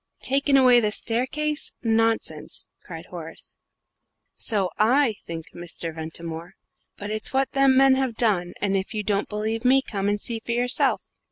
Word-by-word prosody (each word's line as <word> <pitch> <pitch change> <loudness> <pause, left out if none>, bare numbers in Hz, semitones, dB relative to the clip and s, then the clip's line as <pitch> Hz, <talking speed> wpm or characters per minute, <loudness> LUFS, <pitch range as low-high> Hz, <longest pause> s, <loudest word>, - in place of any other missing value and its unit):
"Taken 275 +1 +4
away 250 -2 +6
the 210 -3 0
staircase? 275 +8 0
Nonsense!" 225 0 0 0.2
cried - - -9
Horace. - - -7 0.8
"So 195 -6 -1
I 245 +3 +4
think, 165 -1 -7
Mr. 170 -1 -4
Ventimore 165 +1 -7 0.4
but 205 +1 -5
it's 215 +3 -3
what 270 0 +1
them 275 -1 +4
men 270 0 +6
have 260 -4 -1
done, 190 -7 +1
and 195 -1 0
if 195 +3 -2
you 210 - -1
don't 205 -1 -1
believe 220 +2 -2
me, 265 +1 +4
come 200 -4 -2
and 205 0 0
see 230 +2 -3
for 235 +1 -4
yourself!" 245 +1 +1
225 Hz, 160 wpm, -24 LUFS, 195-260 Hz, 0.8 s, away